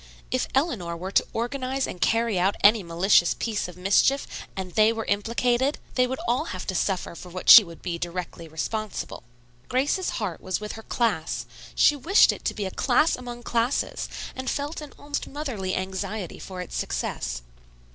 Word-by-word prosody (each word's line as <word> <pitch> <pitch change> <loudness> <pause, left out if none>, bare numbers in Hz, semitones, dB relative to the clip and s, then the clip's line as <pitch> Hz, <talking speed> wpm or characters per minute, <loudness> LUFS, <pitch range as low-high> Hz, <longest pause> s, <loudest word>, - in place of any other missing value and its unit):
If 255 - 0
Eleanor 225 - 0
were 185 +3 -5
to - - +3
organize 260 +3 -2
and 180 - -7
carry 225 -4 +2
out 190 +3 +2
any 210 +2 +6
malicious 175 +1 +3
piece 220 -5 -2
of 180 -1 -11
mischief 200 +9 +3 0.3
and 190 -1 -5
they 215 +3 +4
were 225 -1 -3
implicated, 240 +6 +1 0.2
they 250 -1 +3
would 260 +1 -3
all 245 +2 +1
have 185 0 -5
to - - -2
suffer 185 0 -1
for 180 +2 -10
what 185 +1 +3
she 225 - +12
would 170 -3 -12
be 170 -2 -3
directly 175 -1 -5
responsible. 210 +7 -4 0.5
Grace's 280 +9 +1
heart 200 -7 -3
was 185 - -2
with 210 0 -5
her 220 - -8
class. 220 -9 -1 0.3
She 295 - +5
wished 330 - +5
it - - -8
to - - -1
be 205 - -3
a 190 - -3
class 280 - +3
among 240 -1 -8
classes, 235 +3 -1 0.3
and 260 0 -3
felt 290 +3 -3
an 300 - -9
almost 290 0 -4
motherly 250 -11 -3
anxiety 190 0 -4
for 185 -1 -7
its 180 - -7
success. - - -3
215 Hz, 180 wpm, -25 LUFS, 185-250 Hz, 0.5 s, she